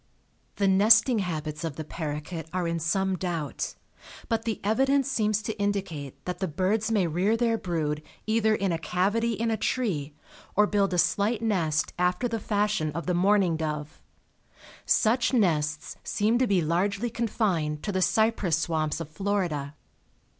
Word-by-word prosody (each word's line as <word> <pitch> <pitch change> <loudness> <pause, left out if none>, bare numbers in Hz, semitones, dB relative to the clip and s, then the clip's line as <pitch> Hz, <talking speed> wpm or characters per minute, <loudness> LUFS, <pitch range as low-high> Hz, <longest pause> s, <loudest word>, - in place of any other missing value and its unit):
The 200 - +1
nesting 220 +5 +5
habits 155 -4 -3
of 160 -4 -3
the 155 - -5
paroquet 155 +1 -5
are 180 -2 -1
in 165 0 -1
some 190 +3 0
doubt, 170 -5 -3 0.5
but 225 -1 0
the 225 -3 -2
evidence 270 +6 +2
seems 215 -3 +1
to 220 - -2
indicate 165 -10 -3
that 180 -1 -4
the 190 - -1
birds 195 +7 0
may 205 -5 +2
rear 180 +7 +1
their 230 -1 +2
brood 160 -7 -2 0.2
either 220 0 +2
in 195 -3 0
a 165 - -1
cavity 205 +8 0
in 225 +2 -1
a 220 - 0
tree 155 - -1 0.4
or 210 - +5
build 200 -2 +1
a - - 0
slight 210 +6 +1
nest 165 -9 0
after 180 +7 +1
the 230 -1 -3
fashion 205 -6 0
of 170 +2 -4
the 180 - 0
mourning 185 -2 +3
dove. 150 -1 -4 0.9
Such 235 +3 +3
nests 155 -8 0
seem 220 +3 +1
to 255 - +3
be 190 -5 +2
largely 200 +8 0
confined 185 -10 -1
to 205 - -2
the 185 -1 -1
cypress 210 -5 +2
swamps 160 -2 -1
of 165 - -5
Florida. 160 -5 -2
190 Hz, 160 wpm, -27 LUFS, 160-220 Hz, 0.9 s, nesting